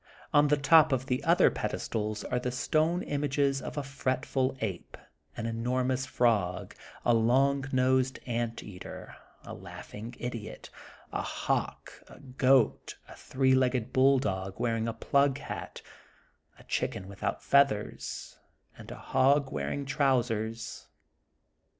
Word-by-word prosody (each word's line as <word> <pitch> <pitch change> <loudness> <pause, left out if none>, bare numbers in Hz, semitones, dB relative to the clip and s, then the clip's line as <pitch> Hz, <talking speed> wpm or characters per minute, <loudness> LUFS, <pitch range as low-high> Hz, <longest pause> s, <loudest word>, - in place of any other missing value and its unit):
On 145 0 +6
the 150 +1 +3
top 155 +2 +6
of 130 -1 0
the 125 -1 -1
other - - +5
pedestals 105 -1 -3
are 125 - -1
the 125 0 -3
stone 155 +7 +1
images 140 -1 0
of - - -7
a 145 - -1
fretful 135 -1 -1
ape, 100 -6 -5 0.4
an 115 - -3
enormous 125 +3 -1
frog, 100 -7 0 0.3
a 120 - +4
long 135 +4 +3
nosed 130 0 +2
ant 120 -1 -3
eater, 90 -3 -9 0.3
a - - -8
laughing 115 +3 -9
idiot, 120 -3 -7 0.4
a - - -1
hawk, - - -3
a - - -14
goat, 130 -1 +2
a - - -12
three 130 0 +1
legged 130 -2 +1
bull 135 +1 +5
dog 95 -5 -3
wearing 115 -1 0
a 115 - -2
plug 140 +4 +2
hat, - - -7 0.7
a - - -16
chicken 95 - -3
without 100 0 -4
feathers, 140 -7 +1 0.4
and - - -12
a - - -7
hog 140 +1 +2
wearing 75 - -3
trousers. 120 -5 -1
130 Hz, 130 wpm, -29 LUFS, 115-135 Hz, 0.7 s, On